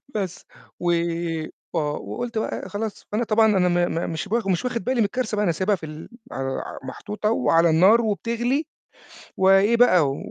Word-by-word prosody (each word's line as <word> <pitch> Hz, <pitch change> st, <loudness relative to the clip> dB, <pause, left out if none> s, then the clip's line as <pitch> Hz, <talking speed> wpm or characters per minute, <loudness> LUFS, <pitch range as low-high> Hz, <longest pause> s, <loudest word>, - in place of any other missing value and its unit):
بس. 190 Hz, -4 st, -4 dB, 0.3 s
و 175 Hz, -, +1 dB, 0.8 s
آه، 150 Hz, -3 st, 0 dB
وقُلت 240 Hz, +4 st, -4 dB
بقى 220 Hz, -, -3 dB
خلاص 205 Hz, +2 st, -5 dB
فأنا 220 Hz, +3 st, 0 dB
طبعًا 220 Hz, 0 st, +3 dB
أنا 180 Hz, -1 st, +3 dB
ما 175 Hz, 0 st, +2 dB
ما 165 Hz, -, -2 dB
مش 160 Hz, +3 st, -4 dB
بخ 225 Hz, 0 st, 0 dB
مش 185 Hz, +2 st, 0 dB
واخِد 240 Hz, -5 st, -2 dB
بالي 260 Hz, +4 st, 0 dB
من -, -, +4 dB
الكارثة 225 Hz, +2 st, -2 dB
بقى، 210 Hz, -, +1 dB
أنا 175 Hz, -, +2 dB
سايبها 190 Hz, +5 st, +1 dB
في 165 Hz, -, -9 dB
ال 155 Hz, +1 st, -9 dB, 0.2 s
على 135 Hz, 0 st, -3 dB, 0.3 s
محطوطة 210 Hz, 0 st, -3 dB
وعلى 165 Hz, -6 st, +3 dB
النار، 190 Hz, +9 st, +5 dB
وبتغلي 235 Hz, +6 st, -1 dB, 0.7 s
وإيه 195 Hz, +4 st, +5 dB
بقى، 185 Hz, -, +5 dB
و -, -, -5 dB
205 Hz, 180 wpm, -23 LUFS, 175-230 Hz, 0.8 s, النار